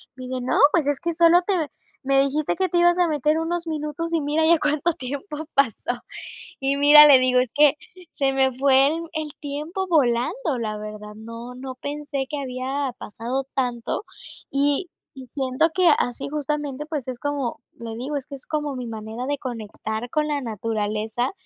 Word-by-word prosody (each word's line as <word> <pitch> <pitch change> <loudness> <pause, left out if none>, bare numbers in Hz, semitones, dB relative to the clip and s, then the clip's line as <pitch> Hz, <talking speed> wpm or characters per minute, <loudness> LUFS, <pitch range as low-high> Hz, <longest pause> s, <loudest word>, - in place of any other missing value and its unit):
Me 255 - -8
dice: 255 0 -3
"No, 250 - -1 0.2
pues 315 -5 +2
es 290 -1 +1
que 340 0 -1
solo 340 +1 +6
te 400 - +1 0.5
me 275 0 +5
dijiste 285 +2 0
que 375 -1 0
te 345 - 0
ibas 350 +1 +4
a 355 - +4
meter 300 +1 +1
unos 340 +1 -2
minutos 310 +1 -3
y 325 - +2
mira 300 +2 +1
ya 335 -1 +5
cuánto 300 +3 +1
tiempo 285 +6 -6 0.2
pasó". 245 -2 +1 0.6
Y 275 +1 +1
mira, 295 +1 +9
le 275 -3 +8
digo: 255 0 +3
"Es 250 -2 0
que 295 0 +5 0.4
se 275 -1 +2
me 265 -1 +3
fue 270 +1 +4
el 325 +3 -1
el 310 -2 -3
tiempo 305 +6 -4
volando, 270 - +1
la 215 -2 -3
verdad, 210 0 -8
no 230 +3 -9
no 260 +1 -7
pensé 285 0 -4
que 295 - -3
había 265 +1 -3
pasado 245 +5 -4
tanto", 245 - -1 0.5
y 285 +5 +1 0.4
siento 270 +3 +1
que 370 -2 +4
así 245 +2 -2
justamente, 295 -1 -3
pues 295 -6 -4
es 250 -1 -5
como, 285 -4 -3 0.2
le 225 -1 -6
digo: 275 +5 -3
"Es 270 - -7
que 280 - -7
es 265 - -14
como 295 -2 -2
mi 250 -1 -5
manera 220 +2 -6
de 285 0 -1
conectar 220 -2 -5
con 300 +2 0
la 295 -1 -1
naturaleza" 220 +1 -2
275 Hz, 185 wpm, -23 LUFS, 250-300 Hz, 0.6 s, mira